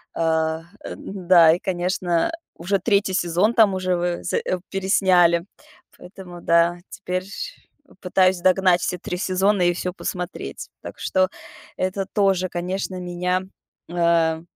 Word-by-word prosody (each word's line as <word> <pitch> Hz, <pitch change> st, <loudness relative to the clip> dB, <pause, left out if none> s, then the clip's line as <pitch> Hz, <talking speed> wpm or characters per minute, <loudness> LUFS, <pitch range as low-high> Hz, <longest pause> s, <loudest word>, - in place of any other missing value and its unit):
А, 160 Hz, 0 st, 0 dB, 0.2 s
э, -, -, -7 dB
н-да, 175 Hz, -4 st, +4 dB
и 175 Hz, -, -2 dB
конечно, 180 Hz, -, -1 dB, 0.2 s
уже 195 Hz, +4 st, -1 dB
3 200 Hz, 0 st, +1 dB
сезон 185 Hz, +5 st, +1 dB
там 215 Hz, -4 st, +5 dB
уже 185 Hz, -1 st, 0 dB
ве 175 Hz, 0 st, -2 dB
з 180 Hz, -, -2 dB
э, 180 Hz, -, -1 dB
пересняли. 185 Hz, -3 st, +3 dB, 0.5 s
Поэтому 180 Hz, -1 st, -11 dB
да, 170 Hz, +1 st, +3 dB
теперь 185 Hz, -1 st, -4 dB
ш 200 Hz, -, -8 dB, 0.4 s
пытаюсь 185 Hz, 0 st, +2 dB
догнать 185 Hz, -1 st, +3 dB
все 180 Hz, -, -2 dB
3 180 Hz, -, -5 dB
сезона 190 Hz, +1 st, +1 dB
и 175 Hz, -, +4 dB
всё 180 Hz, 0 st, -4 dB
посмотреть. 180 Hz, -1 st, -6 dB
Так -, -, -10 dB
что, 185 Hz, 0 st, +1 dB, 0.5 s
это 190 Hz, +1 st, -2 dB
тоже, 190 Hz, -3 st, +1 dB
конечно, 185 Hz, +2 st, -3 dB
меня, 180 Hz, +1 st, -2 dB, 0.5 s
а, 170 Hz, -2 st, +2 dB
180 Hz, 135 wpm, -22 LUFS, 175-190 Hz, 0.5 s, там